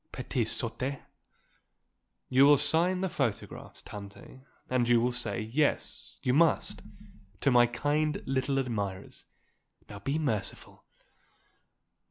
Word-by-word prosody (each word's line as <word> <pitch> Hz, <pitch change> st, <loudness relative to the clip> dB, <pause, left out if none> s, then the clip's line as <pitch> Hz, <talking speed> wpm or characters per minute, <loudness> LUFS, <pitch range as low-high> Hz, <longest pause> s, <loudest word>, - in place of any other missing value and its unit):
Petites -, -, -1 dB
sottes." 135 Hz, +2 st, -2 dB, 1.3 s
"You 130 Hz, +2 st, +5 dB
will 145 Hz, 0 st, +7 dB
sign 175 Hz, +6 st, +1 dB
the 190 Hz, -, +1 dB
photographs, 130 Hz, -, -4 dB
Tante 100 Hz, +5 st, -11 dB, 0.3 s
and 125 Hz, -2 st, +1 dB
you 120 Hz, -1 st, +5 dB
will 120 Hz, +2 st, +1 dB
say, 120 Hz, -1 st, -1 dB
yes, 130 Hz, +8 st, -2 dB
you 125 Hz, -, +2 dB
must 160 Hz, +3 st, +2 dB, 0.6 s
'To 140 Hz, -, +3 dB
my 120 Hz, -1 st, +6 dB
kind 150 Hz, +4 st, -1 dB
little 135 Hz, +1 st, 0 dB
admirers.' 105 Hz, -8 st, -4 dB, 0.6 s
Now 100 Hz, -, -9 dB
be 135 Hz, +9 st, -2 dB
merciful." 115 Hz, -11 st, -3 dB
130 Hz, 115 wpm, -29 LUFS, 115-145 Hz, 1.3 s, will